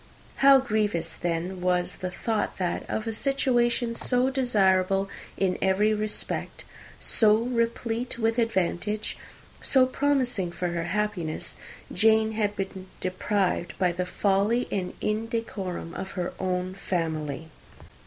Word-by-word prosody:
How 275 Hz, 0 st, +8 dB
grievous 210 Hz, -10 st, 0 dB
then 175 Hz, +2 st, -3 dB
was 180 Hz, -1 st, +1 dB
the 185 Hz, -, -3 dB
thought 215 Hz, +4 st, -2 dB
that, 180 Hz, -2 st, -2 dB
of 220 Hz, -, -2 dB
a 225 Hz, -, -2 dB
situation 240 Hz, -2 st, +1 dB
so 250 Hz, +2 st, +1 dB
desirable 195 Hz, -7 st, +2 dB, 0.3 s
in 185 Hz, -2 st, +1 dB
every 205 Hz, +3 st, +3 dB
respect, 215 Hz, 0 st, -2 dB, 0.4 s
so 215 Hz, -2 st, +4 dB
replete 235 Hz, 0 st, -1 dB
with 225 Hz, +1 st, +1 dB
advantage, 210 Hz, -1 st, 0 dB, 0.5 s
so 260 Hz, -2 st, +5 dB
promising 255 Hz, -9 st, +1 dB
for 180 Hz, +1 st, -2 dB
happiness, 175 Hz, -1 st, -2 dB, 0.4 s
Jane 220 Hz, 0 st, +4 dB
had 210 Hz, -2 st, 0 dB
been 190 Hz, -1 st, -5 dB
deprived, 185 Hz, -1 st, -1 dB
by 180 Hz, -2 st, +2 dB
the 180 Hz, +1 st, -3 dB
folly 200 Hz, +6 st, +1 dB
and 185 Hz, -3 st, -2 dB
indecorum 215 Hz, -6 st, -3 dB
of 190 Hz, -, -6 dB
her 180 Hz, -1 st, -2 dB
own 185 Hz, 0 st, -1 dB
family! 160 Hz, -5 st, -3 dB
205 Hz, 120 wpm, -27 LUFS, 180-230 Hz, 0.5 s, How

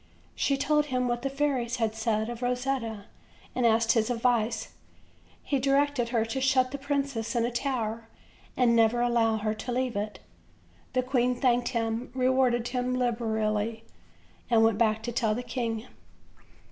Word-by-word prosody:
She 275 Hz, -, +1 dB
told 295 Hz, +2 st, +2 dB
him 255 Hz, -2 st, 0 dB
what 240 Hz, 0 st, -1 dB
the 275 Hz, -, -1 dB
fairies 270 Hz, -4 st, -1 dB
had 225 Hz, -3 st, 0 dB
said 220 Hz, -1 st, -1 dB
of 240 Hz, 0 st, -6 dB
Rosetta, 245 Hz, -4 st, -2 dB, 0.5 s
and 250 Hz, -2 st, +2 dB
asked 225 Hz, 0 st, +3 dB
his 225 Hz, 0 st, +2 dB
ad 240 Hz, -2 st, -1 dB
vice. 230 Hz, -2 st, +1 dB, 0.7 s
He 280 Hz, -, 0 dB
directed 275 Hz, -2 st, +1 dB
her 230 Hz, -2 st, +1 dB
to 265 Hz, +4 st, -3 dB
shut 260 Hz, -1 st, +3 dB
the 280 Hz, -, -5 dB
princess 275 Hz, -4 st, -2 dB
in 235 Hz, -1 st, +2 dB
a 240 Hz, -, -2 dB
tower, 230 Hz, -3 st, -2 dB, 0.5 s
and 240 Hz, -2 st, +4 dB
never 230 Hz, +1 st, +3 dB
allow 235 Hz, -2 st, +2 dB
her 215 Hz, 0 st, -1 dB
to 220 Hz, +3 st, -6 dB
leave 250 Hz, -1 st, -1 dB
it. 210 Hz, +1 st, -3 dB, 0.8 s
The 255 Hz, 0 st, +1 dB
queen 250 Hz, -1 st, +1 dB
thanked 245 Hz, -1 st, +2 dB
him, 230 Hz, 0 st, -2 dB
rewarded 255 Hz, -2 st, +2 dB
him 250 Hz, 0 st, -1 dB
liberally, 225 Hz, -2 st, -1 dB, 0.7 s
and 230 Hz, -2 st, +5 dB
went 225 Hz, -2 st, +3 dB
back 220 Hz, -1 st, +2 dB
to 240 Hz, -, -3 dB
tell 220 Hz, -2 st, +1 dB
the 245 Hz, -, -4 dB
king. 230 Hz, -2 st, -3 dB
240 Hz, 165 wpm, -28 LUFS, 225-255 Hz, 0.8 s, and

